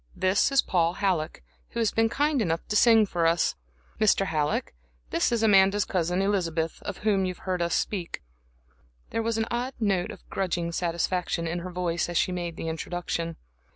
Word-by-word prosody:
This 190 Hz, +8 st, +2 dB
is 275 Hz, -, +4 dB
Paul 170 Hz, -2 st, +1 dB
Halleck, 175 Hz, -, -1 dB, 0.3 s
who -, -, -5 dB
has 225 Hz, -2 st, +2 dB
been 225 Hz, 0 st, +2 dB
kind 290 Hz, +2 st, +1 dB
enough 165 Hz, -4 st, -1 dB
to 210 Hz, -, -1 dB
sing 225 Hz, 0 st, +6 dB
for 170 Hz, -4 st, +1 dB
us. 170 Hz, +1 st, +2 dB, 0.5 s
Mr. 205 Hz, -2 st, +4 dB
Halleck, 155 Hz, -4 st, -1 dB, 0.4 s
this 170 Hz, -, +1 dB
is 235 Hz, -2 st, +1 dB
Amanda's 195 Hz, -1 st, +5 dB
cousin 180 Hz, +1 st, 0 dB
Elizabeth, 170 Hz, -5 st, -1 dB, 0.2 s
whom 205 Hz, -3 st, +2 dB
you've 180 Hz, -1 st, -4 dB
heard 185 Hz, -2 st, -1 dB
us 170 Hz, 0 st, +1 dB
speak 180 Hz, -5 st, -2 dB, 0.5 s
of." 60 Hz, -, -36 dB, 0.4 s
There 225 Hz, -, 0 dB
was 225 Hz, 0 st, -1 dB
an 225 Hz, -, +1 dB
odd 245 Hz, +3 st, -2 dB
note 195 Hz, -5 st, +1 dB
of 200 Hz, -, -11 dB
grudging 175 Hz, -3 st, -1 dB
satisfaction 170 Hz, 0 st, -1 dB
in 170 Hz, +2 st, -2 dB
her 180 Hz, +2 st, -6 dB
voice 175 Hz, -2 st, -1 dB
as 175 Hz, -, -1 dB
she -, -, +2 dB
made 175 Hz, -2 st, -4 dB
the -, -, -5 dB
introduction. 165 Hz, 0 st, -3 dB
180 Hz, 185 wpm, -27 LUFS, 170-210 Hz, 0.5 s, sing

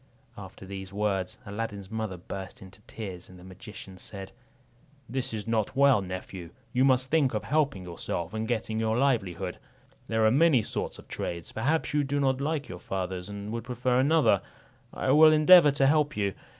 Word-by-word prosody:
After -, -, -10 dB
these 95 Hz, 0 st, -7 dB
words, 100 Hz, 0 st, -1 dB
Aladdin's 100 Hz, -2 st, -5 dB
mother 110 Hz, -4 st, -3 dB
burst 95 Hz, +1 st, -8 dB
into 95 Hz, +2 st, -14 dB
tears; 95 Hz, -5 st, -7 dB
and 90 Hz, -, -13 dB
the 90 Hz, -, -14 dB
magician 95 Hz, 0 st, -10 dB
said, 95 Hz, -1 st, -7 dB, 0.8 s
"This 130 Hz, +2 st, -3 dB
is 110 Hz, -2 st, -4 dB
not 115 Hz, +2 st, -1 dB
well, 140 Hz, -5 st, +5 dB
nephew; 90 Hz, -2 st, -7 dB, 0.2 s
you 130 Hz, -, +3 dB
must 130 Hz, -1 st, +2 dB
think 145 Hz, -7 st, +2 dB
of 105 Hz, -, -2 dB
helping 145 Hz, -8 st, 0 dB
yourself, 85 Hz, 0 st, -4 dB
and 110 Hz, 0 st, -3 dB
getting 110 Hz, -2 st, -2 dB
your 110 Hz, 0 st, 0 dB
livelihood. 95 Hz, -9 st, 0 dB, 0.5 s
There 110 Hz, -1 st, +1 dB
are 110 Hz, -, +5 dB
many 140 Hz, -3 st, +4 dB
sorts -, -, -4 dB
of -, -, -14 dB
trades; 85 Hz, -1 st, -5 dB
perhaps 145 Hz, +9 st, -1 dB
you 150 Hz, -1 st, +2 dB
do 145 Hz, +1 st, -1 dB
not 135 Hz, -1 st, +1 dB
like 150 Hz, 0 st, -2 dB
your 90 Hz, -, -8 dB
father's, 95 Hz, 0 st, -4 dB
and 100 Hz, +1 st, -6 dB
would 115 Hz, -1 st, -4 dB
prefer 125 Hz, +1 st, 0 dB
another; 130 Hz, -, +4 dB, 0.5 s
I 130 Hz, -, -1 dB
will 155 Hz, +2 st, +8 dB
endeavour 155 Hz, +1 st, +8 dB
to 140 Hz, -1 st, +2 dB
help 150 Hz, 0 st, +2 dB
you. 100 Hz, -2 st, 0 dB
110 Hz, 180 wpm, -28 LUFS, 95-135 Hz, 0.8 s, will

